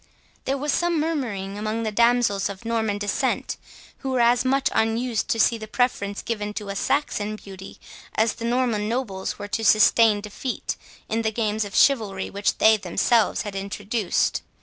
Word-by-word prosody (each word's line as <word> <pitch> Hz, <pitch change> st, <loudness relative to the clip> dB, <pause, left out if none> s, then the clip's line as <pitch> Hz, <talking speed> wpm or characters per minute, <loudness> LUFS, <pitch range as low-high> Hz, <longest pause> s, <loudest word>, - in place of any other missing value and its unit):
There 270 Hz, +1 st, 0 dB
was 290 Hz, +2 st, -1 dB
some 345 Hz, -2 st, +1 dB
murmuring 225 Hz, -11 st, -2 dB
among 215 Hz, +2 st, -2 dB
the 220 Hz, -, -1 dB
damsels 235 Hz, -3 st, +2 dB
of 200 Hz, +3 st, -9 dB
Norman 220 Hz, -3 st, 0 dB
descent, 205 Hz, 0 st, -1 dB, 0.4 s
who 270 Hz, -, -4 dB
were 260 Hz, -1 st, 0 dB
as 240 Hz, +1 st, +4 dB
much 270 Hz, +1 st, +2 dB
unused 225 Hz, +1 st, 0 dB
to 225 Hz, -, 0 dB
see 230 Hz, +2 st, +3 dB
the 215 Hz, -, -7 dB
preference 215 Hz, -4 st, -1 dB
given 210 Hz, -2 st, -3 dB
to 210 Hz, -2 st, -5 dB
a 200 Hz, -, -4 dB
Saxon 215 Hz, -4 st, -1 dB
beauty, 195 Hz, -2 st, -11 dB, 0.4 s
as 220 Hz, 0 st, +2 dB
the 230 Hz, -, -7 dB
Norman 235 Hz, -3 st, 0 dB
nobles 225 Hz, -6 st, -3 dB
were 205 Hz, 0 st, -7 dB
to 225 Hz, -, -2 dB
sustain 215 Hz, 0 st, +5 dB
defeat 210 Hz, +5 st, -4 dB, 0.3 s
in 225 Hz, +1 st, -1 dB
the 220 Hz, -1 st, 0 dB
games 215 Hz, -1 st, -1 dB
of 205 Hz, -, -8 dB
chivalry 210 Hz, -9 st, +2 dB
which 200 Hz, +1 st, 0 dB
they 220 Hz, 0 st, +6 dB
themselves 215 Hz, +4 st, +1 dB
had 205 Hz, -2 st, -6 dB
introduced. 200 Hz, +1 st, -1 dB
220 Hz, 170 wpm, -24 LUFS, 205-240 Hz, 0.4 s, they